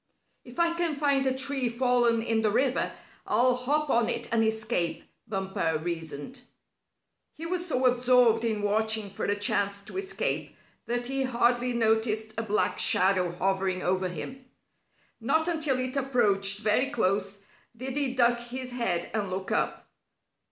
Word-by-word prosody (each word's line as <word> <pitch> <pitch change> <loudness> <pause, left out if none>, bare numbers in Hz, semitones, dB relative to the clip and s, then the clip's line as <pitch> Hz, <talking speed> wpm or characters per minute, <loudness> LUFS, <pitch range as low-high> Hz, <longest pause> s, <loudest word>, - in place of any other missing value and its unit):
"If 245 +6 -11
I 340 0 +3
can 335 -2 0
find 280 -2 +1
a 260 0 0
tree 265 -2 +1
fallen 240 -1 +2
in 225 -1 +1
the 215 - +2
river, 255 +4 +1 0.4
I'll 250 +1 +4
hop 285 +4 0
on 235 -1 +2
it - - -2
and 230 -1 +3
escape," 220 -7 -1 0.2
Bumper 190 -6 -1
reasoned. 165 - -5 0.9
He 325 - -7
was 355 +1 -2
so 260 -5 0
absorbed 245 -2 +4
in 220 -3 -1
watching 215 0 0
for - - -4
a 205 - +1
chance 200 -1 0
to 290 - -9
escape 390 +1 -2 0.3
that 240 +1 -2
he 270 +2 -1
hardly 245 -1 +1
noticed 220 -1 +1
a 225 - -1
black 210 -4 0
shadow 185 -2 +3
hovering 190 0 -1
over 185 0 0
him. 255 - -7 0.8
Not 320 +1 +1
until 310 -6 +1
it 255 +1 -3
approached 205 -8 +2
very 220 +5 +2
close 200 -5 0 0.4
did 260 +1 -5
he 275 -3 0
duck 240 -1 +3
his 250 +1 -6
head 190 -9 -1
and 210 -3 -1
look 190 +1 -4
up. - - -1
235 Hz, 155 wpm, -27 LUFS, 200-260 Hz, 0.9 s, I'll